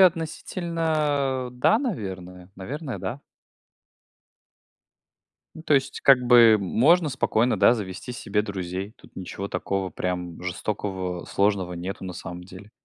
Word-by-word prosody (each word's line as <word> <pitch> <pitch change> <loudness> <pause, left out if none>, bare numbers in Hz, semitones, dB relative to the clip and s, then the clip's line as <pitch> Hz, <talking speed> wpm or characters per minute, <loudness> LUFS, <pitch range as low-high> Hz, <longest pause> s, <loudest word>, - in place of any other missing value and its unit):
относительно, 160 -6 +1
да, 125 - +3
наверное. 95 - -5
Наверное, 130 - -5
да. 100 +9 -5 2.3
Ну, 160 - -10
то 155 - +2
есть, 135 -1 0
как-бы 120 -4 +7
можно 150 - +3
спокойно, 125 -3 +1
да, - - +6
завести 100 +2 -6
себе 105 -3 -1
друзей. 95 0 -5
Тут - - -20
ничего 95 +2 -6
такого 95 0 -2
прям 90 -2 -4
жестокого, 95 -1 -3
сложного 100 -3 0
нету 90 +3 -6
на 90 - -5
самом 90 0 -8
деле. 95 +3 -13
105 Hz, 115 wpm, -25 LUFS, 95-135 Hz, 2.3 s, как-бы